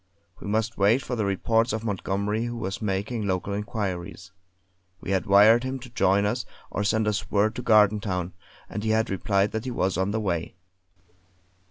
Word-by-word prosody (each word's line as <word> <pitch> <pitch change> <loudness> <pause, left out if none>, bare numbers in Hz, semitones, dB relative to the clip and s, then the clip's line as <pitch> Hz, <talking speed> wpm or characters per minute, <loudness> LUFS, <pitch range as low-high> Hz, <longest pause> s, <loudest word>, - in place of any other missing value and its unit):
We - - -8
must 110 +2 -1
wait 110 +7 +4
for 125 - -3
the 110 -3 -1
reports 115 +4 +1
of 110 0 -3
Montgomery 105 +1 -1
who 120 0 -4
was 95 -2 -4
making 105 +2 -2
local 95 +1 -1
inquiries. 100 -3 -4 0.7
We 95 - -5
had 95 -1 0
wired 105 +4 +6
him 130 +1 -3
to 125 -1 -11
join 100 -3 +2
us, 115 +4 -1 0.3
or 105 - -2
send 110 +1 +1
us 105 0 -1
word 105 +2 +2
to - - -3
Gardentown; 105 -5 +2 0.3
and 105 - -5
he 110 - -1
had 110 -1 +1
replied 100 +1 +1
that 110 +2 -4
he - - -2
was 95 -7 -1
on 95 +1 +1
the 110 +2 -1
way. 85 -7 -2
105 Hz, 185 wpm, -25 LUFS, 95-110 Hz, 0.7 s, wired